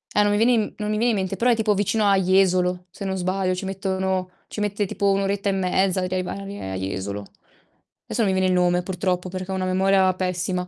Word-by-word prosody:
Eh, 210 - +5
no 205 - +2
mi 205 - +2
viene 230 +3 +4
in 230 - +3
m - - -7
non 210 0 -3
mi 215 - 0
viene 235 +2 +2
in 215 - 0
mente, 190 0 -2
però 245 +4 +2
è - - +4
tipo 220 -2 +1
vicino 205 +2 +1
a 195 - +4
Jesolo, 180 -1 +2
se 200 +3 -8
non 190 0 -1
sbaglio, 185 0 0
ci 185 +2 -4
mettono 190 -1 -2 0.2
ci - - -7
mette 205 0 -1
tipo 200 +1 +1
1 195 0 +1
oretta 200 +1 -1
e - - +2
mezza 190 0 +1
a - - -1
arrivare 185 - -4
a - - -3
Jesolo. 95 +2 -4 0.8
Esso 235 - 0
mi 195 - +2
viene 190 0 +2
il 185 - +2
nome 180 0 +2
purtroppo, 180 0 -2
perché 185 +1 -5
ho - - -1
una 185 0 -1
memoria 190 0 +3
pessima. 180 0 -2
190 Hz, 245 wpm, -23 LUFS, 185-200 Hz, 0.8 s, Eh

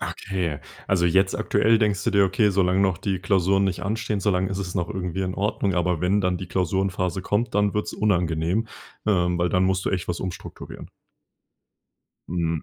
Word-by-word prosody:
Okay, 90 -6 -3 0.3
also 90 -3 +2
jetzt 95 +3 +2
aktuell 110 +1 +3
denkst 105 -3 +1
du - - +2
dir: 100 -1 +4
„Okay, 105 +3 +2
solange 95 0 +2
noch 95 -3 +2
die 95 -3 -2
Klausuren 95 +1 +2
nicht 95 -2 -2
anstehen, 105 0 -2
solange 95 -1 +1
ist 95 0 -4
es 90 -1 -4
noch 85 -2 -1
irgendwie 90 -1 -3
in 95 -1 -2
Ordnung, 100 -1 -1
aber 90 -2 0
wenn 95 +4 +2
dann 90 -2 0
die 95 - -6
Klausurenphase 95 0 -1
kommt, 105 +5 -1
dann 105 0 +2
wird's 105 - -2
unangenehm,“ 90 0 0 0.4
ähm, 90 -4 +2
weil 85 +1 +1
dann 90 0 +2
musst 95 0 0
du - - 0
echt 90 -3 -2
was 85 - -2
umstrukturieren. 95 -2 -8 1.4
Mhm. 85 -2 -1
95 Hz, 185 wpm, -24 LUFS, 90-100 Hz, 1.4 s, dir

